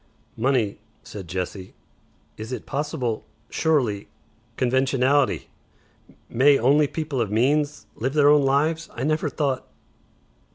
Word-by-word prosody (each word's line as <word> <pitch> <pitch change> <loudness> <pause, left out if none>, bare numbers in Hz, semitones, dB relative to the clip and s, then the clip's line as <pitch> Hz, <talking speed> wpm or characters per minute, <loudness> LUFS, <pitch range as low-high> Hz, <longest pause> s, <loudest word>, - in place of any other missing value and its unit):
"Money," 120 -4 0 0.2
said 95 -4 -9
Jessie. 90 +1 -5 0.6
"Is 110 +3 -8
it 125 - -5
possible 135 -6 -2 0.3
Surely! 125 -11 +1 0.5
Conventionality! 130 +2 +2 0.8
May 140 +4 +4
only 145 +5 +4
people 150 -4 -3
of 110 - -1
means 145 +7 +1
Live 130 +4 -2
their 145 -1 +5
own 150 0 +6
Lives? 150 +4 +1
I 120 - -4
never 155 +2 0
thought 140 -4 -2
135 Hz, 115 wpm, -24 LUFS, 115-145 Hz, 0.8 s, own